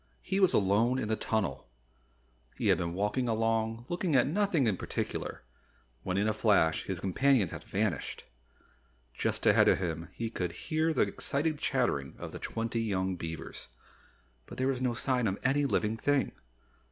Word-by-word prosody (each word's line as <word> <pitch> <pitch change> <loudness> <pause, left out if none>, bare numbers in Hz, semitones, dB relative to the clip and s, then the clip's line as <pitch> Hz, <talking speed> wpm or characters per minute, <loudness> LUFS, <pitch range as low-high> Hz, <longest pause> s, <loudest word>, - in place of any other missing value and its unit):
He 190 +1 -1
was 190 -2 +5
alone 110 +6 +3
in 110 -5 -2
the 110 - +2
tunnel! 80 - -2 0.9
He - - +1
had - - +4
been 85 0 -2
walking 105 +6 0
along 115 +1 0
looking 175 -3 0
at 125 - +5
nothing 175 -2 +1
in 110 -4 +2
particular, - - -4 0.6
when 95 +8 -2
in 105 +2 +2
a 110 - +2
flash 100 -7 +2
his 95 -3 -3
companions 100 +2 +2
had - - -7
vanished. 100 -6 -2 0.9
Just - - -2
ahead - - +6
of - - +5
him 85 -2 -3
he 115 +2 -4
could 90 -6 -3
hear 160 0 0
the - - +1
excited 150 +1 -1
chattering 120 - 0
of - - -7
the - - -7
twenty 115 0 -2
young 95 -4 -1
beavers. 80 -2 -6 0.8
But - - -10
there 130 - +1
was 130 -2 -1
no 125 -2 0
sign 125 -1 +1
of 95 0 -1
any 140 +2 +2
living 110 -3 0
thing. 145 +3 +1
115 Hz, 170 wpm, -30 LUFS, 95-135 Hz, 0.9 s, ahead